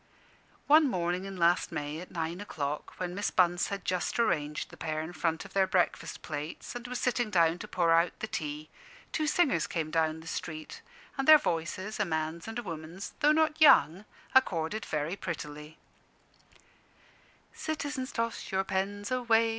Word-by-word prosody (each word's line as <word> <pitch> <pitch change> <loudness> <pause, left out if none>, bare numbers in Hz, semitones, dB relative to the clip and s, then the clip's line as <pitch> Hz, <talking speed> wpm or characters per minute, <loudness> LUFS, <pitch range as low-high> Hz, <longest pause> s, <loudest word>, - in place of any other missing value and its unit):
One 300 0 +6
morning 180 -1 -1
in 195 -1 -7
last 175 +1 +3
May, 150 +1 -4
at 180 - -10
nine 165 +2 -3
o'clock, 150 -7 -4
when 180 -1 -3
Miss 205 +3 -1
Bunce 175 -1 +3
had 200 -2 -5
just 180 -1 -1
arranged 150 -10 0
the - - -11
pair 155 -1 -3
in 160 +3 -5
front 160 +2 -1
of 200 - -13
their 195 -1 +3
breakfast 180 -1 0
plates, 150 0 -5
and 245 0 -6
was 250 0 -4
sitting 245 -2 0
down 170 -3 +3
to - - -7
pour 170 -2 +1
out 165 +1 +3
the - - -2
tea, 150 -6 -5 0.4
two 310 -2 0
singers 305 -8 +2
came 165 -6 -3
down 160 -1 +1
the - - -14
street, 155 -1 -6 0.4
and 270 - 0
their 310 0 +11
voices 185 - -3
a 210 - +2
man's 160 +1 -3
and 225 +1 -5
a 240 - -3
woman's 165 +1 -7
though 300 0 +5
not 315 0 +2
young, 185 - +6 0.3
accorded 210 -5 +2
very 155 +4 -1
prettily: 150 -4 -6 1.8
"Citizens, 290 -4 -3
toss 230 -1 -3
your 190 0 +1
pens 200 +3 -2
away! 230 -3 +3
180 Hz, 170 wpm, -30 LUFS, 160-225 Hz, 1.8 s, their